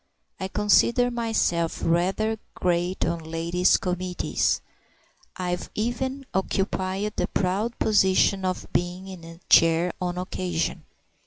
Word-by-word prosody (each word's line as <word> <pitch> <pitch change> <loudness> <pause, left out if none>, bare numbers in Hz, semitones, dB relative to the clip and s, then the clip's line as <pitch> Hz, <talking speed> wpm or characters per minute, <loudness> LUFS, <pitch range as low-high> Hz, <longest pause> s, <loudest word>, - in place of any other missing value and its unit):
I 190 - -2
consider 235 +5 +3
myself 225 -8 0
rather 195 +6 +1 0.2
great 180 +1 0
on 170 0 -1
ladies' 165 +3 +2
committees; 180 0 -1 0.8
I've 180 -1 -3
even 260 +5 -2
occupied 190 +1 -1
the - - +1
proud 205 +5 -1
position 195 -1 +3
of 185 -1 -2
being 180 +2 -1
in 185 -3 -9
the 165 0 -12
chair, 165 +1 +5
on 180 0 -2
occasion. 180 -2 -2
185 Hz, 110 wpm, -25 LUFS, 175-210 Hz, 0.8 s, chair